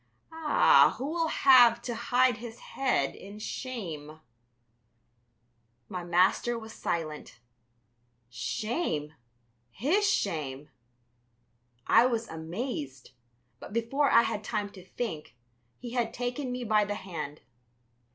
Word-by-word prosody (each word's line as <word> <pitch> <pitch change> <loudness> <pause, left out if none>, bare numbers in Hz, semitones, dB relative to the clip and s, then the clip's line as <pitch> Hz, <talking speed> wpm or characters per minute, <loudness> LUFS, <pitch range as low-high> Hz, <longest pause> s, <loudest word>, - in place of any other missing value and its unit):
Ah, 320 -2 +5
who 260 - -4
will 325 +2 0
have 245 -6 +6
to 240 - -3
hide 245 +1 +2
his 230 0 -9 0.2
head 245 - 0
in 200 +2 -11
shame?" 170 - -6 1.7
My 180 -1 -5
master 185 +7 +2
was 220 -1 -9
silent. 155 -6 -4 0.9
Shame! 150 - -3 0.6
His 355 - +1
shame! 150 - -2 1.2
I 245 - +6
was 230 -2 -2
amazed, 160 - -5 0.5
but - - -10
before 255 +6 +1
I 230 - +6
had 210 -2 -3
time 210 -1 -3
to 185 -3 -13
think, 180 - -6 0.4
he 245 -1 -8
had 240 -2 -1
taken 250 +2 -3
me 250 0 -4
by 215 -2 +3
the 205 0 -3
hand. 165 -7 -6
220 Hz, 110 wpm, -29 LUFS, 165-250 Hz, 1.7 s, have